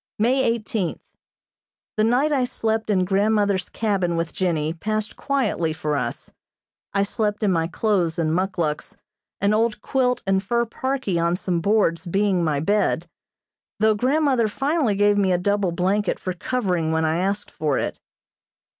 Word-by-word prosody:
May 250 +5 +2
eighteenth: 220 -6 -1 1.0
The 215 - +2
night 250 +7 +2
I 270 -3 +2
slept 225 -3 -1
in 185 -3 +2
grandmother's 200 -1 +1
cabin 195 -6 0
with 165 0 -2
Jennie 160 -4 0
passed 215 +5 -3
quietly 215 - 0
for 155 -1 -2
us. - - -4 0.6
I 200 0 +2
slept 210 +1 -2
in 205 - +3
my 165 -2 +1
clothes 180 -3 0
and 160 -2 0
muckluks, 175 -4 -2 0.4
an 200 +1 +3
old 220 0 +1
quilt 250 -2 0
and 190 0 +2
fur 235 +4 0
parkie 260 - -2
on 170 +1 +2
some 180 -2 -1
boards 200 -3 +1
being 195 0 +1
my 150 -3 +1
bed, 180 0 +1 0.7
though 220 +1 +4
grandmother 255 +1 +2
finally 270 0 0
gave 205 0 +3
me 190 -2 +2
a 180 - +3
double 200 0 0
blanket 190 +4 0
for 185 - -3
covering 180 -5 -1
when 160 0 +1
I 160 +1 +1
asked 200 +2 -2
for 150 -3 -1
it. - - -3
200 Hz, 155 wpm, -23 LUFS, 175-220 Hz, 1.0 s, though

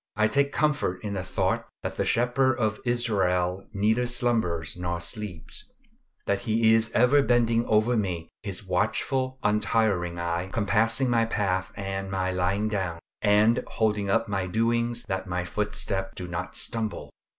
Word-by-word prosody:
I 110 +1 +3
take 140 +3 +1
comfort 145 -14 0
in 105 -1 -3
the 95 -2 -3
thought - - -1 0.2
that - - -3
the - - -1
Shepherd 125 +2 +2
of 110 -3 -1
Israel 95 -6 0
neither 110 +4 +1
slumbers 110 -10 0
nor 85 -1 -3
sleeps; 85 -3 -6 0.6
that 100 -1 +1
He 110 0 +4
is 115 0 +3
ever 130 +4 +5
bending 120 -2 +2
over 110 +3 +3
me 90 -6 -2
his 100 -1 -4
watchful, 115 +8 0
untiring 105 -4 +1
eye, 85 +1 -2
compassing 115 +4 +2
my 115 -1 +3
path 95 -4 -1
and 95 -1 -4
my 95 -1 -1
lying 95 +3 0
down, 95 -5 -2 0.2
and 105 +3 +4
holding 105 -3 0
up 115 +3 +2
my 95 -2 -1
doings 115 +3 0
that 95 0 -3
my 90 0 -2
footsteps 100 -1 -2
do 90 - -5
not 85 +1 -5
stumble. 110 -2 -2
105 Hz, 150 wpm, -26 LUFS, 95-115 Hz, 0.6 s, ever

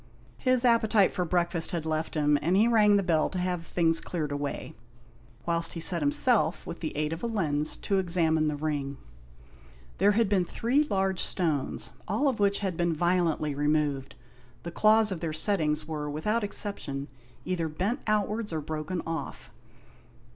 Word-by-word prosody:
His 255 -1 +2
appetite 220 -4 +4
for 180 - -1
breakfast 170 -1 0
had 165 -2 -2
left 160 0 -2
him, 150 -1 +3
and 170 +5 +1
he 215 +4 +4
rang 210 -3 +5
the 200 - +1
bell 165 -4 +2
to 185 - -5
have 180 -1 -1
the 165 - -15
things 165 -2 +2
cleared 155 -5 -3
away, 145 0 -4 0.7
whilst 170 -1 -1
he 170 - -5
set 170 0 +4
himself, 205 - +1
with 170 - -7
the 155 -3 -5
aid 150 +1 -1
of 165 - -6
a 235 - -1
lens, 155 -9 0
to 195 -1 -1
examine 165 -4 +1
the 150 - -1
ring. 145 -2 -3 1.0
There 205 +1 +4
had 225 +1 +2
been 195 -2 +2
three 250 - +1
large 190 -7 0
stones, 160 -7 -1 0.2
all 290 - +1
of 255 -5 0
which 200 0 +2
had 190 -3 -2
been 175 -1 0
violently 170 -3 +1
removed. 145 -2 0 0.5
The 170 - -5
claws 215 +3 +4
of 185 - -3
their 160 -2 -3
settings 155 -4 0
were, 150 -2 -4
without 210 +10 -1
exception, 155 -9 -3 0.4
either 175 -3 -1
bent 190 - -2
outwards, 215 +1 0
or 160 - -2
broken 155 +4 -4
off. 165 0 -6
170 Hz, 175 wpm, -28 LUFS, 155-205 Hz, 1.0 s, rang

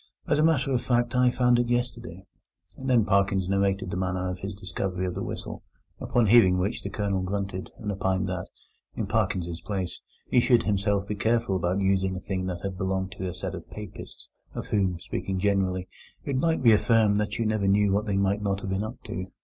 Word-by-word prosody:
As - - +1
a - - +4
matter 145 -4 +3
of 125 -2 +1
fact, 120 0 +1
I 125 0 +4
found 125 -1 +3
it 120 -1 0
yesterday." 120 -7 -2 0.5
And 130 0 -5
then 120 -4 +4
Parkins 95 -2 +2
narrated 100 -1 0
the - - -2
manner 90 0 -1
of 90 - -6
his 100 +2 -5
discovery 95 -1 -3
of 90 - -2
the 95 - -4
whistle, - - -5 0.4
upon 120 -2 +1
hearing 100 -4 +6
which 100 +6 -1
the - - -5
Colonel 100 -3 -1
grunted, 95 0 -3
and 105 -2 -3
opined 95 -1 0
that, 90 -1 -3 0.5
in - - -2
Parkins's 85 -2 -1
place, 95 -2 -4 0.3
he - - +4
should 120 -1 +4
himself 100 -1 +1
be 105 - -2
careful 110 -1 +1
about 90 +2 0
using 95 -1 +1
a - - -4
thing 95 -1 -3
that 90 -2 -4
had 95 -2 -4
belonged 95 0 -1
to 95 - -2
a 90 - -4
set 90 - -4
of - - -8
Papists, 105 -2 -9 0.3
of - - -4
whom, 95 -4 +1
speaking 95 +2 -3
generally, 95 -2 0 0.4
it 140 - -1
might 160 +2 +1
be 115 - +7
affirmed 105 -1 +4
that 105 +2 -2
you 115 - 0
never 105 -2 +1
knew 100 0 +4
what 105 +2 0
they 100 -1 0
might 100 +1 +1
not 100 -1 -1
have 95 - -4
been 95 +2 0
up 115 +3 -7
to. 90 +1 -5
100 Hz, 215 wpm, -27 LUFS, 95-110 Hz, 0.5 s, be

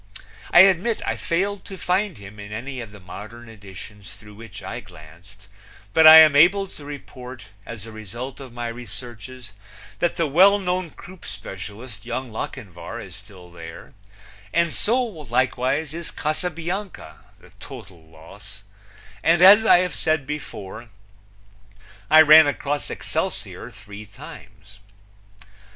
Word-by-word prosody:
I 175 - +9
admit 195 +4 +3
I - - -1
failed 195 +4 -2
to 195 - -9
find 185 - -1
him 100 +1 -12
in 100 0 -9
any 125 +4 -6
of 115 -3 -9
the 105 - -13
modern 110 +6 -11
editions 100 -2 -12
through 105 -1 -15
which 110 -1 -11
I - - -5
glanced, 90 +6 -16 0.5
but 160 -1 +7
I 160 0 +12
am 155 -2 +6
able 185 +7 +5
to 150 - -14
report, 130 -3 -10 0.2
as 115 -3 -8
a 115 - -10
result 115 +6 -8
of 135 -3 -10
my 120 0 -5
researches, 120 0 -9 0.5
that 175 - 0
the 165 - 0
well 185 +8 +5
known 180 -2 -2
croupe 180 +3 -14
specialist, 105 +3 -8
Young 125 +1 -5
Lochinvar, 110 -5 -7
is - - -10
still 95 -3 -14
there 85 +6 -11 0.6
and 170 0 +1
so 235 +4 +1
likewise 140 - -1
is 170 0 -6
Casabianca, 170 - -4 0.2
the - - -19
total 90 -3 -11
loss; 95 +6 -15 0.6
and 165 +6 +3
as 210 +4 +8
I 180 +1 +5
said 155 -4 -1
before, 120 -6 -7 1.2
I 155 0 +8
ran 155 0 +8
across 145 0 -2
Excelsior - - -4
three 105 0 -12
times. 100 0 -14
125 Hz, 135 wpm, -22 LUFS, 100-160 Hz, 1.2 s, I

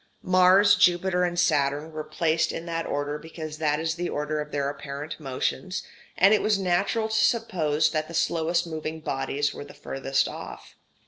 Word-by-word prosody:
Mars, 185 +2 +5
Jupiter, 180 0 +3
and 175 -1 0
Saturn 150 -2 +1
were 155 -1 -5
placed 160 +1 0
in 165 - -6
that 165 -1 -3
order 145 +1 -2
because 155 -1 -8
that 150 -1 +1
is 160 0 -1
the 175 +1 -3
order 150 +1 -2
of 150 0 -7
their 140 -1 -1
apparent 145 +2 -6
motions, 135 +5 -3 0.3
and 195 +3 +6
it 215 - +3
was 215 -1 +2
natural 195 +4 0
to - - -4
suppose 160 -11 +1
that 155 -1 -1
the 165 - -8
slowest 170 +1 +1
moving 160 -1 -5
bodies 140 0 -1
were - - -7
the - - -13
furthest 135 0 -1
off. - - -9
160 Hz, 180 wpm, -26 LUFS, 150-175 Hz, 0.3 s, and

